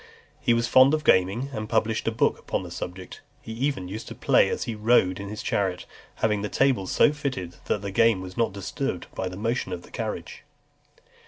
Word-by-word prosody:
He 120 - +2
was 115 0 +1
fond 130 +4 +6
of 155 - -4
gaming, 100 +9 +3
and 110 -2 -4
published 110 0 0
a - - +3
book 110 - +1
upon - - -3
the - - -9
subject. 90 +1 -7 0.2
He - - -9
even 120 -5 -2
used 105 +4 -7
to - - -8
play - - +3
as - - -2
he 115 - -3
rode 105 -4 +3
in 100 0 -6
his 105 0 -6
chariot, 95 -3 -1 0.3
having 105 -2 0
the 105 - -3
tables 130 -9 +1
so 150 - +4
fitted, 130 - -4
that 105 - -1
the 100 - -4
game 115 0 +4
was 95 0 -8
not 115 -4 +1
disturbed 100 -1 -4
by 95 - -3
the 90 - -8
motion 115 -1 -2
of 90 -1 -5
the - - -16
carriage. - - -5
105 Hz, 215 wpm, -25 LUFS, 95-115 Hz, 0.3 s, fond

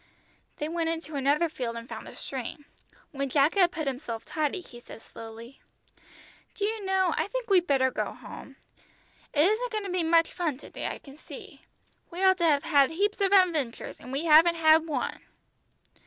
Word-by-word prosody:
They 300 - -3
went 330 0 -1
into 325 -2 -5
another 285 +4 +2
field 245 -7 -5
and 230 0 -7
found - - -8
a - - -11
stream. 270 +2 -7 0.5
When 275 -2 -3
Jack 285 +3 +3
had 360 -3 +4
put 320 -4 -4
himself 250 -4 -4
tidy 310 +3 -2
he 240 -8 -13
said 225 - -13
slowly 230 +3 -11 0.9
"Do 405 - -1
you 435 0 -3
know 380 -3 +1
I - - 0
think - - -4
we'd 360 -2 +4
better 260 -2 +3
go - - -2
home. - - -11 0.8
It 300 +1 +3
isn't 470 +4 0
going 430 -2 -2
to 390 - -5
be 360 -1 0
much 330 0 +3
fun 330 -7 -2
to - - -14
day, - - -4
I - - -4
can 275 0 -15
see. - - -12 0.5
We 360 +2 -5
ought 375 0 +5
to 340 - +2
have 290 -3 +3
had 285 -5 +4
heaps 405 +5 -1
of 390 -1 +2
adventures, 335 -11 +1
and 250 - -10
we 280 +5 -2
haven't 330 +2 +6
had 320 0 +4
one." 285 -5 -3
320 Hz, 195 wpm, -27 LUFS, 275-365 Hz, 0.9 s, haven't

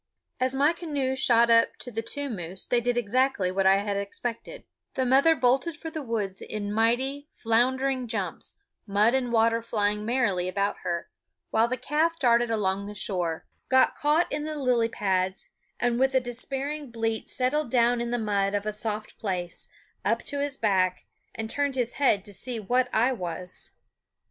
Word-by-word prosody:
As 255 +1 +1
my 290 +4 +3
canoe 290 -6 -2
shot 235 -3 +4
up 230 0 +4
to 245 - -8
the 225 0 -2
two 285 +5 -4
moose 185 -6 -3
they 240 -1 +1
did 245 0 0
exactly 240 -4 +1
what 190 0 +2
I 195 0 +6
had 200 0 -2
expected; 230 - -5 0.3
the 260 - +1
mother 275 +6 +5
bolted 270 +5 +1
for 325 +1 -7
the 315 -1 -4
woods 210 -7 -3
in 205 -1 -4
mighty, 260 +6 +1
floundering 255 +3 +1
jumps, 200 -7 -3 0.3
mud 210 +4 +4
and 255 -2 0
water 230 0 +3
flying 210 -2 0
merrily 215 -6 +1
about 200 +2 -1
her; 170 -1 -4 0.4
while 225 +1 +3
the 255 +2 -2
calf 310 +6 0
darted 240 -4 +3
along 200 -2 0
the 210 - -8
shore, 175 -6 -2 0.2
got 260 0 +5
caught 300 +4 +1
in 295 +1 -2
the 310 0 -4
lily 245 -4 +2
pads, 190 -3 -1 0.3
and 240 0 +1
with 265 0 +2
a - - +6
despairing 270 +4 -4
bleat 225 -1 -2
settled 265 +2 0
down 240 0 +3
in 235 - -2
the 245 - 0
mud 205 -3 0
of 205 0 -2
a 215 - 0
soft 215 0 -4
place, 180 -4 -2 0.4
up 230 +4 +1
to 285 - -3
his 285 -1 -2
back, 185 -4 +1 0.3
and 225 0 -3
turned 285 +3 0
his 245 -2 0
head 205 -8 +3
to 205 - -5
see 245 +3 -2
what 250 +4 +1
I 235 +4 +3
was. 180 -3 -5
235 Hz, 180 wpm, -27 LUFS, 205-260 Hz, 0.4 s, I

